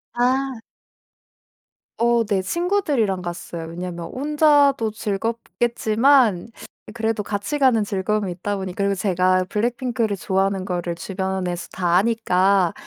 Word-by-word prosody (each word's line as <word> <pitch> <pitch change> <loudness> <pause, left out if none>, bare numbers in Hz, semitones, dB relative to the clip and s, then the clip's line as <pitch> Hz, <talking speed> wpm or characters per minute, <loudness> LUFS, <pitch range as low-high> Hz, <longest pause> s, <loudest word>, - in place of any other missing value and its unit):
아. 260 +2 +1 1.5
어 235 0 +3
네. 200 -2 0
친구들이랑 285 - 0
갔어요. 175 -1 -6
왜냐면 170 0 -6
혼자도 285 -4 +3
즐겁겠지만 230 +1 +1 0.5
그래도 225 -1 -1
같이 205 +9 -3
가는 250 -6 +4
즐거움이 200 0 -1
있다 200 +4 -3
보니까 190 0 -4
그리고 200 0 +1
제가 185 -1 +2
블랙핑크를 235 -1 -1
좋아하는 190 0 0
거를 175 -2 -3
주변에서 190 -1 -3
다 175 -2 0
아니까 195 -4 +2
205 Hz, 290 characters per minute, -22 LUFS, 185-240 Hz, 1.5 s, 가는